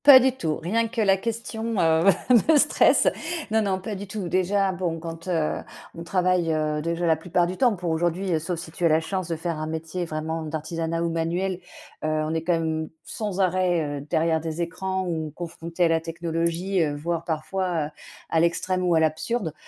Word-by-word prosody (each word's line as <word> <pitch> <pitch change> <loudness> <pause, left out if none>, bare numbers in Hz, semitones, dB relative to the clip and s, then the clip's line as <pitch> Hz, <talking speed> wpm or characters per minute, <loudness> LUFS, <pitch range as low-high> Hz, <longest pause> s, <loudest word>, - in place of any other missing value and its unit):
Pas 280 -2 +11
du 260 +1 +3
tout, 160 -10 -1
rien 220 +8 0
que 230 +1 -6
la 195 -3 +5
question, 230 +1 -3
heu, 160 0 +3 0.4
me 315 - +7
stresse. 295 +1 +5 0.4
Non, 220 0 +3
non, 195 -3 0
pas 200 +3 -5
du 200 +1 -6
tout, 195 -3 -4
déjà, 190 +2 +2
bon, 175 -2 -2
quand, 165 +1 -8
heu, 165 -4 0 0.4
on 165 - -7
travaille, 180 -1 +1
heu, 155 -1 0
déjà, 170 +2 -1
la 165 -1 +4
plupart 175 +2 +1
du 180 +2 -3
temps, 245 0 +3
pour 175 -2 -3
aujourd'hui, 175 +1 0
sauf 170 +2 -3
si 165 -1 -7
tu 175 - -7
as - - +6
la 155 +1 +4
chance 185 +2 -3
de 170 - -2
faire 165 0 -3
un 155 - -3
métier 160 +2 -3
vraiment 160 0 -3
d'artisanat 160 +2 -3
ou 170 - 0
manuel, 175 +3 -1 0.4
heu, - - 0
on 155 0 0
est 160 - 0
quand 175 +2 +1
même 160 -1 -1
sans 205 -3 -3
arrêt, 175 -5 +1
heu, - - -7
derrière 160 -1 +2
des 165 +1 -2
écrans 190 +2 -3
ou 160 -3 -3
confrontés 170 0 -3
à - - +6
la 165 0 +2
technologie, 170 +3 -1
heu, 150 -2 0
voire 165 +3 -2
parfois 170 +3 -2
à 160 -4 -1 0.4
à 165 - +2
l'extrême 180 +2 +1
ou 175 -2 +3
à - - +5
l'absurde. 160 +4 0
170 Hz, 205 wpm, -25 LUFS, 160-185 Hz, 0.4 s, Pas